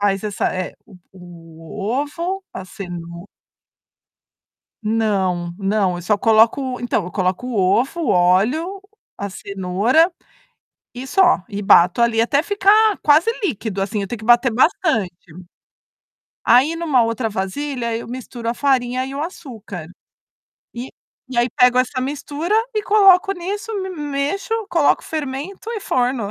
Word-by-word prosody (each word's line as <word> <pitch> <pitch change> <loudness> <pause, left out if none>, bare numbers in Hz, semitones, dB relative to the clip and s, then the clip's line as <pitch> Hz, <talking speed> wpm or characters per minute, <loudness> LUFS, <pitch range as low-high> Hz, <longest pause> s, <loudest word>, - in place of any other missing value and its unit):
Faz 195 -1 +1
essa 205 -2 -1
eh, 185 -1 -4
o 190 -4 -17 0.7
o 205 - -8 0.2
ovo, 345 +6 -4
a 190 - -7
ceno 175 -2 -8 1.6
Não, 195 -6 -1
não. 195 -2 0
Eu - - -8
só 210 +4 +1
coloco 230 +4 +3
então 245 -5 -1
eu 180 - -7
coloco 185 +4 -1
o 250 - -4 0.3
ovo, 275 +7 -4
o 295 - -1
óleo, 220 - +2 0.4
a 200 0 -5
cenoura, 200 - +1 0.8
e 250 +2 -7
só. 360 - +3
E 205 -1 -5
bato 180 +2 +5
ali 230 -1 +3
até 280 +5 +1
ficar 410 +2 +3
quase 305 +8 +4
líquido 220 - -2
assim. 205 +2 -2
Eu 195 - -4
tenho 235 +3 -6
que 215 - -10
bater 240 +1 +4
bastante. 255 - +1 1.3
Aí 255 +6 +5
em - - -6
uma 280 -8 +3
outra 230 0 -2
vasilha, 235 +5 -3
eu 230 - -6
misturo 240 -1 -6
a - - -1
farinha 255 -1 0
e 270 - -7
o 285 - -3
açúcar. 220 - -8 0.9
E 245 +2 -6 0.4
e 240 - -1
aí 240 +1 +3
pego 250 +1 +4
essa 255 +1 0
mistura 290 +6 -4 0.2
e 430 - 0
coloco 395 -2 +5
nisso, 395 +4 -5
me 380 - -4
mexo, 295 +5 -3 0.2
coloco 330 -6 +2
o - - -17
fermento 310 - -5
e 465 - -3
forno. 245 - -1
245 Hz, 150 wpm, -20 LUFS, 200-305 Hz, 1.6 s, bato